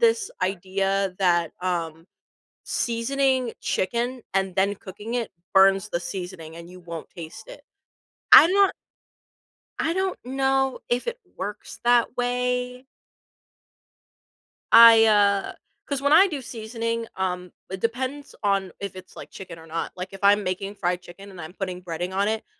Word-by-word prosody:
this 455 -3 +2
idea 195 +1 -1
that, 175 -4 +2
um, 165 -3 -3 0.6
seasoning 255 +1 0
chicken 240 +6 -2
and 190 -1 0
then 200 +2 +2
cooking 210 +4 -8
it 235 -3 -2 0.2
burns 195 +1 +5
the 170 - -1
seasoning 175 -4 -7
and 170 0 -10
you 185 - -12
won't 170 -2 -8
taste 165 - -10
it. - - -11 0.7
I'm 335 - +10
not 400 -1 +4 1.1
I 325 - +1
don't 380 +1 -1
know 270 0 0
if 245 - -1
it 475 0 -3 0.2
works 205 +2 -7
that 240 0 +3
way 250 +1 -1 1.9
I, 230 -1 +9
uh 200 -2 +3 0.3
'cause 280 -1 -3
when 285 - +2
I 360 +6 +8
do 295 -6 -5
seasoning, 230 0 -4
um, 180 -1 -3 0.2
it 190 - -5
depends 260 +6 -3
on 195 -2 0
if 200 -2 -6
it's 185 0 -12
like - - -10
chicken 180 -3 -10
or 160 - -14
not, 165 +1 -4
like 180 +1 -5
if 195 - -10
I'm 205 +1 +4
making 190 +2 -3
fried 180 -2 -1
chicken 195 +3 -13
and 185 - -11
I'm 160 +2 -9
putting 185 -2 -5
breading 175 +1 -4
on 200 +2 +1
it, 220 0 -2
200 Hz, 150 wpm, -24 LUFS, 185-250 Hz, 1.9 s, I'm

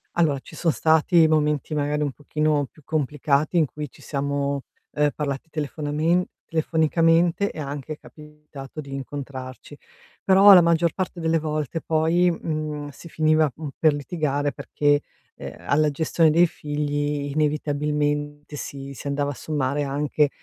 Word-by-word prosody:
Allora 155 -5 +2
ci 155 - -14
son 165 +1 +1
stati 160 +2 +4
momenti 150 -1 +1
magari 150 0 0
un 145 -2 0
pochino 150 +1 0
più 155 - -21
complicati 150 +2 0
in 160 - +5
cui 150 +1 -7
ci - - -19
siamo, 140 -1 -2 0.3
uhm, 150 0 +2
parlati 145 +1 -4
telefonamen 155 +3 0 0.2
telefonicamente, 165 +3 +2
è - - -9
anche 145 +1 -5
capitato 150 -1 -11
di 140 -2 -11
incontrarci, 135 0 -7 0.5
però 195 +1 +7
la 180 - +8
maggior 170 -1 +2
parte 185 -2 -4
delle 165 0 +1
volte 155 0 -2
poi, 165 +3 +2
mhmm, 155 -3 -4
si 145 +4 -12
finiva, 155 -2 +2
mh, 155 -1 -7
per 155 -2 +4
litigare 145 -1 -1
perché, 145 +1 +1 0.3
ehm, - - -8
alla 150 +2 +1
gestione 160 +2 +2
dei 170 +3 +5
figli 145 -1 -2
inevitabilmente 145 0 -1
si 140 -1 -7
si - - -10
andava 140 0 -1
a - - -3
sommare 145 -1 -1
anche 145 +1 +1
150 Hz, 145 wpm, -24 LUFS, 145-160 Hz, 0.5 s, la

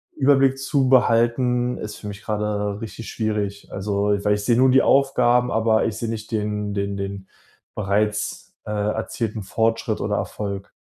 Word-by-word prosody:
Überblick 135 -1 +3
zu 135 -1 +1
behalten 125 0 +3
ist 105 - -6
für 105 - -9
mich 105 +1 -8
gerade 105 -1 -2
richtig 115 +1 -7
schwierig. 105 -2 -3
Also, 100 +1 -2 0.2
weil 105 0 +3
ich 105 - -5
sehe 120 - +3
nur 130 +1 +5
die 135 - +5
Aufgaben, 125 -3 +3
aber 110 0 +2
ich 110 -2 -2
sehe 115 - -3
nicht 115 0 -5
den 105 -1 -2
den 100 0 -2
den 100 -1 -5 0.5
bereits, 105 +1 -1
äh, - - -8
erzielten 105 +1 -2
Fortschritt 115 +3 0
oder - - -1
Erfolg. 100 -1 -4
110 Hz, 160 wpm, -22 LUFS, 105-120 Hz, 0.5 s, nur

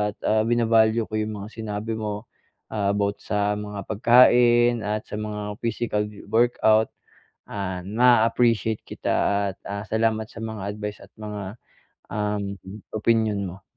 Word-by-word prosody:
at, - - -54
ah, 110 0 +3
vina-value 115 -1 +3
ko 110 - -2
yung 110 0 -2
mga 100 +1 -7
sinabi 110 0 -4
mo. 105 +1 -4 0.4
Ah, 100 -2 0
about 100 0 -1
sa 105 0 0
mga 105 -2 -6
pagkain 120 +1 +5
at 105 +1 -2
sa 105 - -5
mga 105 0 -5
physical 110 -2 -1
wo 105 +2 -2
workout. 110 -2 +3 0.6
Ah, 95 -2 -4
naa-appreciate 115 -1 +3
kita - - -4 0.4
at, - - -47
ah, 100 +1 -4
salamat 110 -1 0
sa - - -12
mga 110 -3 -5
advice 105 -1 -5
at - - -17
mga, 105 -2 -6 0.6
uhm, 105 -2 -2 0.4
opinyon 110 -2 +1
mo. 95 +2 -9
110 Hz, 145 wpm, -24 LUFS, 105-115 Hz, 0.6 s, pagkain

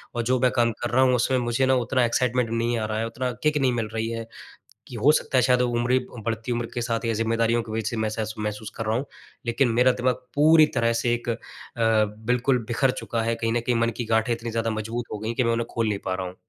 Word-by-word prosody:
और 120 - 0
जो 125 +2 +1
मैं 125 0 +3
काम 120 -1 +2
कर 120 - -1
रहा 125 +2 +3
हूँ 130 -1 +4
उसमें 125 +2 +1
मुझे 120 +2 +1
ना 130 0 +3
उतना 125 0 +1
एक्साइटमेंट 125 0 +1
नहीं 115 +1 0
आ 110 - -1
रहा 110 0 -3
है, 115 - -1
उतना 125 +2 -3
किक 150 0 +2
नहीं 130 -3 +2
मिल 115 -2 -1
रही 110 0 -1
है। 115 0 -4 0.6
कि 125 - -9
हो 120 +7 +4
सकता 150 -3 0
है - - +5
शायद 125 0 +3
वो 125 - +1
उम्र 125 +2 +2 0.3
बढ़ती 115 +1 -2
उम्र 120 0 -1
के 120 - -2
साथ 115 0 -2
या 115 - +1
ज़िम्मेदारियों 115 +1 +1
के 110 - -9
बीच 110 -1 -2
सी - - -4
महसेस 110 0 -2
महसूस 105 0 -4
कर 115 - -3
रहा 110 +1 0
हूँ। 135 - -3 0.4
लेकिन 120 +2 +2
मेरा 130 +1 +6
दिमाग 125 0 +2 0.2
पूरी 155 +2 +6
तरह 115 0 +2
से 120 +1 +1
एक 120 0 -3
अ, 115 - +1 0.4
बिल्कुल 115 +3 +1
बिखर 125 +3 +2
चुका 115 -2 -3
है। 115 +1 0
कहीं 115 0 -1
न 120 - +2
कहीं 120 +1 0
मन 115 - +2
की 120 - -2
गाठें 110 +1 +1
इतनी 115 0 -5
ज़्यादा 115 0 -1
मजबूत 110 +3 -3
हो 105 - -4
गई 110 - -5
है - - -1
कि 125 - +2
मैं 115 - +2
उन्हें 115 0 -1
खोल 115 -1 0
नहीं 100 -2 -2
पा 95 - -1
रहा 95 0 -4
हूँ। 90 - -9
115 Hz, 275 wpm, -25 LUFS, 115-125 Hz, 0.6 s, मेरा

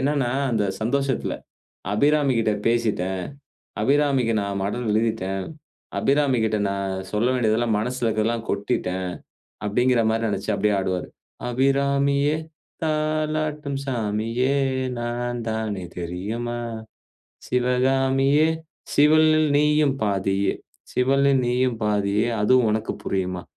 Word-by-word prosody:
என்னனா 140 -2 +1 0.2
அந்த 110 -3 +1 0.2
சந்தோஷத்துல, 135 +3 0 0.6
"அபிராமி 145 +4 +3
கிட்ட 110 -1 +2
பேசிட்டேன். 100 -6 0 0.6
அபிராமிக்கு 140 -4 +2
நான் 100 -1 -3
மடல் 115 +4 -2
எழுதிட்டேன். 105 -4 0 0.5
அபிராமிகிட்ட 130 -6 +2
நான் 100 -1 -2 0.2
சொல்ல 110 +4 +1
வேண்டியதெல்லாம் 115 -1 +1
மனசுல 125 +2 -2
இருக்கறதெல்லாம் 115 +1 -1
கொட்டிட்டேன்!" 95 -2 -1 0.6
அப்டிங்கிற 125 +3 +2
மாரி 115 0 0
நெனைச்சு 100 -1 -2
அப்டியே 105 +1 +1
ஆடுவாரு. 95 -1 -2 0.4
"அபிராமியே! 140 +3 +2 0.5
தாலாட்டும் 155 -2 -1
சாமியே! 115 +2 -1 0.5
நான் 120 +1 -3
தானே 110 -4 -3 0.2
தெரியுமா? 110 +8 -4 0.9
சிவகாமியே! 135 +4 +2 0.5
சிவனில் 155 +1 +5
நீயும் 150 -1 +3
பாதியே 100 -1 +1 0.4
சிவனில் 135 +1 +3
நீயும் 125 -1 +1
பாதியே 105 +2 +1
அதுவும் 120 +1 +4
உனக்கு 110 +1 -2
புரியுமா?" 90 -2 -2
120 Hz, 95 wpm, -23 LUFS, 105-140 Hz, 0.9 s, சிவனில்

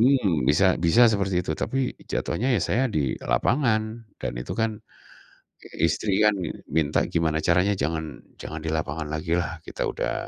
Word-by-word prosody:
mmm, 110 - +3
bisa 95 +5 +4
bisa 105 +9 +6
seperti 95 -3 0
itu 80 - -1
tapi 135 -1 -1 0.2
jatuhnya 130 +3 0
ya - - 0
saya 125 +5 +1
di 75 - 0
lapangan 110 - 0
dan - - -3
itu - - -5
kan, 110 -2 0 1.0
istri 95 +5 +1
kan 105 -1 +5
min 85 -4 -4
minta 75 -1 +1
gimana 80 -2 0
caranya 90 +4 +3
jangan 80 +2 -3 0.2
jangan 80 - -6
di - - -2
lapangan 80 0 -2
lagilah 85 +2 -2
kita - - -4
udah - - -2
90 Hz, 160 wpm, -25 LUFS, 80-110 Hz, 1.0 s, bisa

